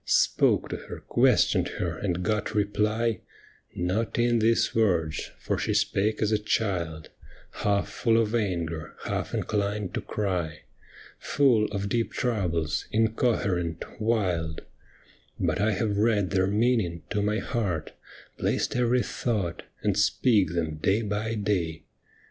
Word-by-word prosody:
Spoke - - +3
to - - -3
her, - - -9
questioned - - +3
her, 85 -2 -2
and 90 +1 -2
got 105 +1 -1
reply 105 +2 +1 0.3
— - - -27 0.2
Not 100 +6 -1
in 120 0 +3
these 115 +1 +2
words, 85 -8 +1
for - - -2
she - - 0
spake 105 +3 +1
as 105 - +1
a 110 - +2
child, 90 -7 -2 0.4
Half 100 -1 0
full 115 -1 +2
of 110 -1 0
anger, 85 -8 -2
half - - -2
inclined 105 -2 -1
to - - -2
cry. 90 -6 -2 0.6
Full 125 -7 +3
of 100 -1 -3
deep 115 +3 0
troubles, 85 -10 -1
incoherent, 110 -7 0 0.2
wild. 90 -8 0 0.8
But - - 0
I 105 -1 +2
hav^ 105 +2 0
read 105 -3 +2
their 95 -1 +2
meaning 105 -5 +1
to 105 -1 +1
my 105 +1 +1
heart, 95 -10 -2 0.5
Placed - - 0
every 125 0 +2
thought, 105 -8 -2 0.2
and 105 -2 +2
speak 105 -3 +3
them 80 -2 -1
day 100 +8 +1
by 105 +2 -2
day. 90 -6 -1
105 Hz, 135 wpm, -27 LUFS, 90-110 Hz, 0.8 s, Spoke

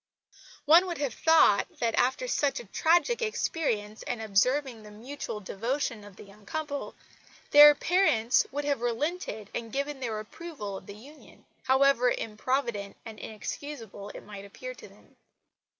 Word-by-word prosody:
One 335 +5 +6
would 345 -2 -4
have 275 -5 -2
thought 320 -11 +4
that, 230 -1 0
after 260 - +1
such 285 - 0
a - - -9
tragic 345 - +2
experience 235 - -2
and 240 - -4
observing 230 +4 +1
the 210 - -12
mutual 225 +1 -7
devotion 230 +3 -3
of 205 -2 -13
the - - -12
young 205 +1 -17
couple, 290 +4 -5 0.6
their 295 0 +10
parents 285 - +2
would 290 +1 -3
have 285 -4 0
relented 240 - -3
and 230 -1 -5
given 280 +2 -3
their 225 -4 -3
approval 215 - -7
of 190 - -10
the 200 - -9
union, 280 +8 -16 0.2
however 265 -1 +4
improvident 225 -2 -2
and 220 -2 -9
inexcusable 220 -2 -7
it - - -8
might 200 -1 -9
appear - - -8
to - - -13
them. - - -22
250 Hz, 150 wpm, -28 LUFS, 215-295 Hz, 0.6 s, their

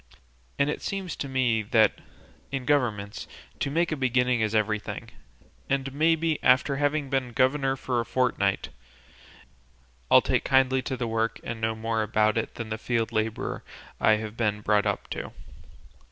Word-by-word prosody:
And 140 - +2
it 150 - -2
seems 195 -3 -4
to 140 - -4
me 125 -4 +1
that, 110 0 +3 0.5
in 135 -2 -3
governments, 115 -8 0 0.3
to - - -1
make 170 +4 +1
a - - +1
beginning 125 -3 +1
is 110 0 0
everything; 105 0 -1 0.6
and 135 -1 -1
maybe, 160 +1 +2
after 130 +2 +4
having 145 -1 0
been 130 -3 -1
governor 135 +2 +2
a 125 -3 -1
fortnight, 115 -6 0 1.4
I'll - - +8
take - - 0
kindly 130 -1 +3
to 130 +1 -4
the 120 -1 -2
work 115 0 -1
and 115 -1 -5
know 110 0 0
more 110 0 -1
about 110 0 +2
it 115 - -2
than 115 -2 -6
the 110 0 -4
field 115 -1 -1
labour 110 0 -2 0.4
I 110 - +5
have 110 0 -3
been 105 -3 0
brought 105 0 +2
up - - -2
to." - - -5
125 Hz, 160 wpm, -26 LUFS, 110-135 Hz, 1.4 s, I'll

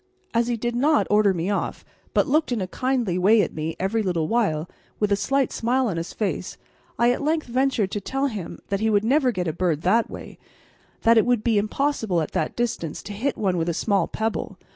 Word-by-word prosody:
As 230 0 +2
he 240 -1 0
did 240 +1 -2
not 295 +5 +3
order 210 -1 +5
me 180 +2 -1
off, 200 - -3 0.3
but - - +4
looked 305 0 +1
in 240 - 0
a 190 - -1
kindly 235 -2 -1
way 205 +3 +5
at - - -4
me 160 +1 -3
every 200 +4 0
little 175 -6 0
while, 175 -9 0 0.3
with 210 -1 +1
a - - +5
slight 275 +5 0
smile 255 +3 +1
on 185 -6 -2
his 165 +1 -4
face, 210 -3 -3 0.4
I 240 +1 +4
at 250 - -2
length 310 +2 0
ventured 250 -5 0
to 205 - -3
tell 270 +7 -1
him 215 -10 -4
that 200 -1 0
he 220 +1 +1
would 205 -1 +3
never 265 +1 +3
get 180 -5 -2
a 160 - -1
bird 165 -3 -1
that 220 +5 +3
way - - -9 0.6
that 230 0 +6
it - - +2
would 245 -3 +2
be 225 -3 +3
impossible 215 -4 0
at 155 - -2
that 155 - -2
distance 225 -10 -3
to 205 - -7
hit 255 +7 -2
one 190 -4 0
with 165 0 0
a 170 - -1
small 195 -2 +1
pebble. 220 0 -3
215 Hz, 230 wpm, -24 LUFS, 185-245 Hz, 0.6 s, that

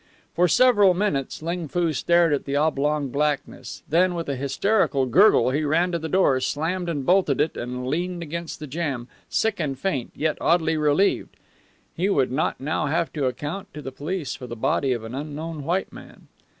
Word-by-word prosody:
For 180 +2 +4
several 205 -2 +5
minutes 155 -8 -1
Ling 170 0 -3
Foo 170 +1 0
stared 170 +1 +3
at 140 - -1
the 140 - -2
oblong 150 -1 +1
blackness; 145 +2 -3
then 180 +3 +2
with 170 -1 -4
a 140 - -1
hysterical 140 - +1
gurgle 170 - +5
he 150 +3 0
ran 165 +5 +1
to 170 - -1
the 160 0 -5
door, 145 -7 +3
slammed 165 +7 -2
and 145 -5 -3
bolted 180 -6 +3
it, 155 - +1
and 125 +1 -5
leaned 175 +5 -2
against 170 +1 -6
the 155 - -6
jamb, 140 -5 -3 0.2
sick 220 -3 0
and 140 -5 -2
faint, 135 -6 -2
yet 155 0 -1
oddly 165 -1 +2
relieved. 150 +6 +1 0.6
He 185 +4 0
would 135 -10 +2
not 135 +5 -1
now 150 +2 -1
have 165 +3 -1
to 145 -4 0
account 150 +9 -5
to 150 - -6
the 135 - -5
police 155 +3 -4
for 130 -2 -8
the 120 - -6
body 130 +4 0
of 120 -3 -2
an 110 +2 -7
unknown 150 +2 -5
white 175 +6 -1
man. - - -13
155 Hz, 190 wpm, -24 LUFS, 140-175 Hz, 0.6 s, several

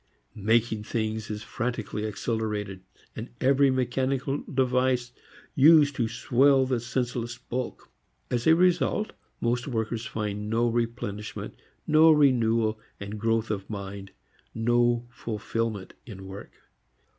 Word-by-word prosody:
Making 110 0 +1
things 110 -1 -3
is 105 0 -5
frantically 110 -3 -3
accelerated; 105 -2 -3 0.3
and 115 +3 -6
every 135 +1 +4
mechanical 130 +2 0
device 125 -2 +1 0.4
used 145 0 +6
to 115 - +1
swell 130 +4 +3
the 130 -2 0
senseless 120 0 -3
bulk. 125 0 -5 0.4
As 120 +2 0
a 160 - +7
result 180 +4 +2 0.3
most 120 +3 0
workers 115 -2 -2
find 105 -1 -4
no 115 +2 +2
replenishment, 115 -3 -3 0.3
no 155 +1 +6
renewal 115 -7 +3 0.2
and 100 +1 -6
growth 115 0 0
of 100 -2 -4
mind, 100 -1 -6 0.5
no 120 +1 +2
fulfilment 110 -3 -4
in 95 -4 -9
work. 95 +2 -9
115 Hz, 115 wpm, -27 LUFS, 110-130 Hz, 0.5 s, a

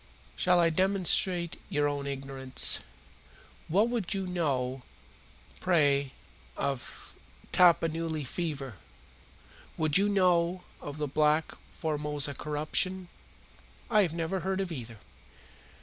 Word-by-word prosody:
"Shall 180 -1 +3
I 165 -1 +4
demonstrate 185 -1 +2
your 145 0 +1
own 145 -1 -3
ignorance? 135 -1 +1 0.9
What 205 +8 +2 0.2
do 195 0 -1
you - - -4
know, 135 -8 -1 0.8
pray, 140 -6 +2 0.4
of 135 -3 -4 0.4
Tapanuli 165 -3 +3
fever? 135 - -4 1.0
What 155 -1 0
do 190 - +5
you 205 - +2
know 180 -2 +2 0.2
of 145 0 -7
the 150 -1 -2
black 150 +2 +2 0.2
Formosa 150 -2 -1
corruption?" 155 +6 -1 0.8
"I 215 -2 +6
have 170 -5 0
never 170 +3 -2
heard 190 +2 -2
of 190 -2 -2
either." 115 -7 -7
160 Hz, 110 wpm, -29 LUFS, 140-180 Hz, 1.0 s, I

